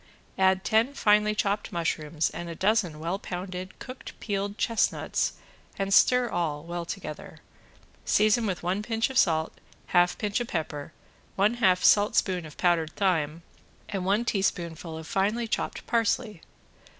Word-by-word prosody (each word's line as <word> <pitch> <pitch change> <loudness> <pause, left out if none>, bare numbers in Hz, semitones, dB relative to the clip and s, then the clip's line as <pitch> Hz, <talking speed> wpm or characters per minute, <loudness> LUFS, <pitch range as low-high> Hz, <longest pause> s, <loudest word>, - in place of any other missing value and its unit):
Add 190 0 +3
ten 230 +5 +2
finely 210 -1 +3
chopped 205 0 -1
mushrooms 160 -2 -1
and 175 0 -6
a 165 - -6
dozen 190 -4 +1
well 170 +5 -2
pounded 185 0 -6
cooked 255 +1 -10
peeled 200 0 -3
chestnuts 230 -2 0 0.4
and 195 0 -1
stir 250 +3 +5
all 155 -7 -2
well 170 0 -5
together, 165 -4 -7 0.7
season 215 +2 +3
with 185 -3 -3
one 185 +4 0
pinch 225 +3 -1
of 265 - -3
salt, 160 -3 +2 0.4
half 175 0 +4
pinch 210 +1 -1
of 240 - -3
pepper, 155 -4 -4 0.4
one 205 +4 +3
half 185 -7 +3
saltspoon 200 -5 +3
of 150 - -14
powdered 170 -3 +1
thyme, 165 -4 0 0.5
and 195 -3 -3
one 205 +5 +1
teaspoonful 170 -6 -2
of 160 - -8
finely 210 +7 0
chopped - - -3
parsley. 220 -4 0
190 Hz, 145 wpm, -27 LUFS, 170-215 Hz, 0.7 s, stir